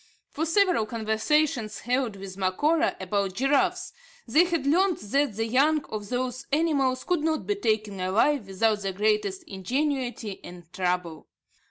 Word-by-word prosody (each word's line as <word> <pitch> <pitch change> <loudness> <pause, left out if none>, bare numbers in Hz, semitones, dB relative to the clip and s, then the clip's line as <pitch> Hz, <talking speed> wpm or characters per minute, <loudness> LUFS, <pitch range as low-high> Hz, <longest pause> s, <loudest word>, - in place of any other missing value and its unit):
From 320 +3 -2
several 360 - +2
conversations 220 +1 0
held 245 -2 -1
with 195 -1 -8
Macora 295 - +1
about 195 0 -1
giraffes, 270 +5 +1 0.3
they 335 +4 +5
had 335 -5 -1
learnt 355 +5 +2
that 270 +3 0
the 225 +1 -1
young 285 +6 +2
of 210 -2 -6
those 255 0 -3
animals 280 -4 +1
could 355 -4 0
not 315 -1 0
be 415 - +1
taken 215 - -1
alive 210 +6 +1
without 210 +3 +1
the 195 -1 -3
greatest 210 -1 0
ingenuity 245 +1 -3
and 175 0 -10
trouble. 180 -3 -2
235 Hz, 145 wpm, -26 LUFS, 200-295 Hz, 0.3 s, they